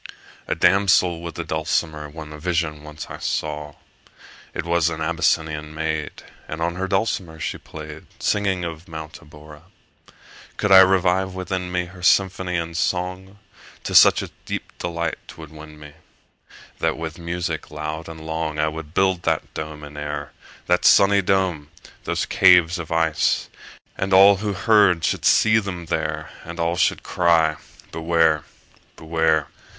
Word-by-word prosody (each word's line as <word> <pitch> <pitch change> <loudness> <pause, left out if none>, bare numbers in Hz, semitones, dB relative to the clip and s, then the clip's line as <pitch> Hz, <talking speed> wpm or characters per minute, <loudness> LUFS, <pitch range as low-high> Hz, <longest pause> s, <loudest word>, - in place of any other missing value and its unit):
A - - 0
damsel 90 -2 +3
with 85 -1 -7
a 85 - -3
dulcimer 80 -1 -2
In 75 0 -9
a 75 - -10
vision 80 -3 -1
once 75 0 -9
I - - -7
saw: 75 -1 -3 0.8
It - - -5
was 85 -1 +2
an 80 -1 -5
Abyssinian 80 -1 -1
maid, 80 -1 -3 0.2
And 80 - -6
on 85 +1 -1
her 95 +2 -3
dulcimer 95 -5 -1
she - - -4
play'd, 75 0 -10
40 - - -29
Singing 95 -4 0
of 85 0 -7
Mount 80 0 -8
Abora. 75 -2 -14 1.0
Could 105 - 0
I 95 - +10
revive 95 0 +3
within 90 -1 -4
me, 90 0 -1
Her 90 +1 -13
symphony 90 0 +2
and 85 0 -4
song, 90 +3 -2 0.5
To - - -4
such - - +7
a - - -8
deep - - -5
delight 85 -1 -3
'twould 80 -2 -11
win 75 0 -12
me, 75 -1 -12 0.9
That - - 0
with 80 +1 -6
music 85 -1 -4
loud 75 +2 -6
and 80 -1 -10
long, 80 -1 -3
45 75 +1 +1
I - - 0
would 80 0 -8
build 95 -2 +2
that - - -2
dome 75 -1 -7
in 75 0 -10
air, 75 0 -5 0.3
That 90 0 +2
sunny 100 0 +6
dome! 90 -6 0 0.4
those - - -1
caves 90 -2 +5
of 85 -1 -7
ice! 80 -1 +1 0.5
And 95 +1 -1
all 100 +1 +7
who 105 +1 -2
heard 100 -4 +3
should - - -1
see 110 0 +5
them 90 -5 -6
there, 80 -1 -3
And - - -9
all 85 +1 0
should 90 - +1
cry, 80 -3 +2 0.3
Beware! 80 -2 +1 0.5
Beware! 80 -2 0
85 Hz, 160 wpm, -22 LUFS, 80-90 Hz, 1.0 s, I